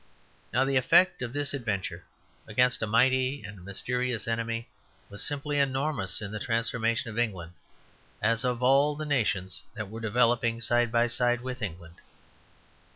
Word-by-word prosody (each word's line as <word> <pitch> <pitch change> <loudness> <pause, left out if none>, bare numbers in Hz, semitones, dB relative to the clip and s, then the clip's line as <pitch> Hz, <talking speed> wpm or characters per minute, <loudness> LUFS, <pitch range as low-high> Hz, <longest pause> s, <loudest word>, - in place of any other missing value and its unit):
Now, 130 +3 +2
the 135 0 +1
effect 175 +8 +4
of 120 -2 -3
this 145 +1 -2
adventure 100 -9 -4 0.4
against 125 +2 +2
a 110 - -1
mighty 130 +4 +2
and 100 -2 -10
mysterious 120 +4 -2
enemy 115 +1 -2 0.4
was 100 - -2
simply 145 0 -1
enormous 135 - 0
in 100 - -6
the 110 - -5
transformation 115 0 -1
of 110 - -4
England, 95 -8 -2 0.7
as 115 +3 +1
of 125 -1 -1
all 140 +3 +4
the 155 +1 -5
nations 110 -10 -1
that 105 -3 -6
were 115 +1 -7
developing 115 +1 +1
side 120 0 +2
by 120 0 +3
side 120 0 +4
with 130 0 -6
England. 85 -4 -7
120 Hz, 155 wpm, -28 LUFS, 110-130 Hz, 0.7 s, effect